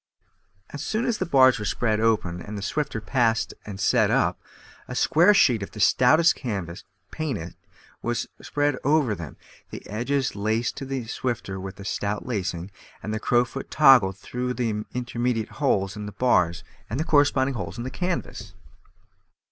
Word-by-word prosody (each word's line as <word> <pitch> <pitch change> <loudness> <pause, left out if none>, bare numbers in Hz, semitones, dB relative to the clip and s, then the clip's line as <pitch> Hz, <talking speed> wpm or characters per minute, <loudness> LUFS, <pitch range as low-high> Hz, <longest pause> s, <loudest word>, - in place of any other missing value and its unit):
As 145 - -6
soon 220 +9 -1
as 235 -3 -1
the - - -1
bars 130 -6 +5
were 105 - -4
spread 110 0 0
open, 105 -6 +1
and 105 +3 -7
the 100 - -5
swifter 140 0 -2
passed 115 -1 0
and 100 -2 -7
set 95 - +3
up, - - +1 0.5
a 125 - -6
square 170 +9 +5
sheet 125 - +4
of 100 - -5
the 105 - -11
stoutest 155 - +5
canvas, 95 - -5 0.3
painted, 110 - -4 0.5
was 120 0 -2
spread 145 -2 0
over 145 -5 +2
them, 85 -7 -8 0.3
the - - -9
edges 130 +5 -1
laced 110 +3 -1
to 135 - -5
the 135 -3 -4
swifter 110 -5 -3
with 95 +1 -8
a 100 - -8
stout 105 0 -2
lacing, 95 -6 -3 0.3
and 105 +4 -3
the 110 - -2
crowfoot 120 +3 0
toggled 125 -11 +5
through 125 +4 -4
the 110 -4 -1
intermediate 120 -2 -1
holes 100 -8 +1
in 105 -1 -6
the - - -6
bars 90 -7 +2 0.3
and 135 +9 -2
corresponding 140 -3 +3
holes 105 -2 -5
in 120 - -4
the 130 - -5
canvas. 115 - -4
120 Hz, 165 wpm, -25 LUFS, 100-135 Hz, 0.5 s, bars